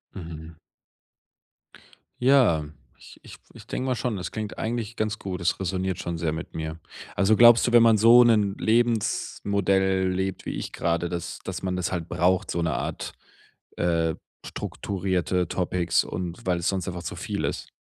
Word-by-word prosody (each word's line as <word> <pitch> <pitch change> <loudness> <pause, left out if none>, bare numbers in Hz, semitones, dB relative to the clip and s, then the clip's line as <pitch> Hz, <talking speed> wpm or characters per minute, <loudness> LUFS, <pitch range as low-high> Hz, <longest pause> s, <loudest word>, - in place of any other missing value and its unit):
Mhm. 80 -3 -8 1.7
Ja, 125 - +4 0.3
ich - - -15
ich - - -12 0.2
ich - - -13
denke 130 - -3
mal 130 - +1
schon, 120 -2 -2
das 90 - -5
klingt 110 -1 -5
eigentlich 115 0 -3
ganz 110 0 -2
gut. 95 -2 -5
Es 85 - 0
räsoniert 95 0 -2
schon 85 -1 -4
sehr 80 -1 -1
mit 80 +3 -6
mir. 80 0 -5 0.4
Also 100 +3 +3
glaubst 120 0 +7
du, - - +1
wenn 120 -1 +7
man 115 -2 +5
so 115 +3 +8
'nen 105 -4 +3
Lebensmodell 100 -4 +1
lebt, 95 +1 -3
wie - - -4
ich - - -5
gerade, 85 0 -1
dass 85 -2 -5
dass - - -6
man 95 -1 -1
das 90 -2 -2
halt 85 -3 -3
braucht, 90 +1 +1
so 85 - -1
'ne 80 -3 0
Art, - - -4 0.6
äh, 85 -2 +1 0.3
strukturierte 90 -2 -2
Topics 90 -1 0
und 90 0 -6
weil 90 -2 +1
es 85 - -2
sonst 95 -2 -2
einfach 85 -1 -5
zu - - -5
viel - - -3
ist? - - -4
95 Hz, 170 wpm, -25 LUFS, 85-110 Hz, 1.7 s, so